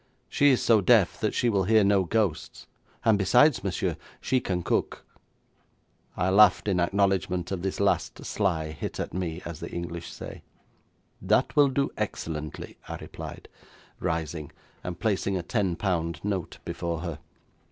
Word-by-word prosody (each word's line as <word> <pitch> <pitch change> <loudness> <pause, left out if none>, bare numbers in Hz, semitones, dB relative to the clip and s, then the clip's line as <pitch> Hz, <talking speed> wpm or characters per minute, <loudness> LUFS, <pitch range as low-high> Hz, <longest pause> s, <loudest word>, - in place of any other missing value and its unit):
She 145 - +4
is 130 - +3
so 110 -3 +5
deaf 90 - +4
that - - -1
she 120 - +2
will 100 -5 +2
hear 110 +1 +5
no 100 -1 +3
ghosts, 95 -4 -1 0.4
and 110 -3 +4
besides, 125 +10 +4
monsieur, 95 -3 -1 0.2
she 130 - +1
can 90 -6 -2
cook.' - - -1 1.1
I 90 +2 +1
laughed 105 0 +6
in 95 -3 +2
acknowledgment 95 -1 +1
of 95 -3 -2
this 95 +1 -3
last - - 0
sly 85 -7 -1
hit 75 - -6
at - - -4
me, 90 -1 -3
as 85 -2 -6
the - - -6
English 85 -1 -6
say. - - -9 0.8
'That 105 +7 +2
will 145 -2 +6
do 135 +1 0
excellently,' 75 -2 -5
I - - -5
replied, - - -9 0.5
rising, 80 -2 -3 0.3
and 90 -1 -5
placing 100 -1 0
a 90 - -3
ten 95 -2 0
pound 85 -4 -1
note 95 -4 -3
before 85 -1 -3
her. 85 -4 -5
95 Hz, 155 wpm, -27 LUFS, 85-105 Hz, 1.1 s, laughed